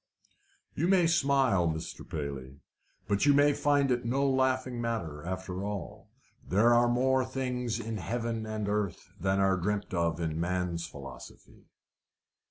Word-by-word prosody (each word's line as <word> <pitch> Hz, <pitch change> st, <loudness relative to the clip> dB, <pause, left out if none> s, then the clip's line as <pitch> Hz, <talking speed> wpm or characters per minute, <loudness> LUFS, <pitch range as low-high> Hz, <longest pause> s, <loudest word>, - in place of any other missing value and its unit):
"You 165 Hz, -, 0 dB
may 185 Hz, -2 st, +4 dB
smile, 135 Hz, -, +3 dB
Mr. 80 Hz, 0 st, -4 dB
Paley, 70 Hz, -3 st, -5 dB, 0.5 s
but 100 Hz, +7 st, +1 dB
you 145 Hz, -, +6 dB
may 145 Hz, +1 st, +5 dB
find 145 Hz, -2 st, +2 dB
it 120 Hz, 0 st, +1 dB
no 135 Hz, +4 st, +1 dB
laughing 130 Hz, -2 st, +1 dB
matter 95 Hz, -11 st, -3 dB
after 95 Hz, +1 st, -4 dB
all. 100 Hz, -3 st, -6 dB, 0.3 s
There 110 Hz, +5 st, +4 dB
are 120 Hz, 0 st, +5 dB
more 130 Hz, +2 st, +2 dB
things 125 Hz, -3 st, -2 dB
in 115 Hz, -1 st, -4 dB
heaven 115 Hz, +4 st, -3 dB
and 110 Hz, -1 st, -3 dB
earth 100 Hz, -3 st, -2 dB
than 95 Hz, 0 st, +1 dB
are 95 Hz, -1 st, +3 dB
dreamt 105 Hz, +3 st, -2 dB
of 85 Hz, -2 st, 0 dB
in 80 Hz, -1 st, -2 dB
man's 85 Hz, -1 st, -1 dB
philosophy." 70 Hz, -2 st, -12 dB
110 Hz, 145 wpm, -30 LUFS, 90-130 Hz, 0.5 s, you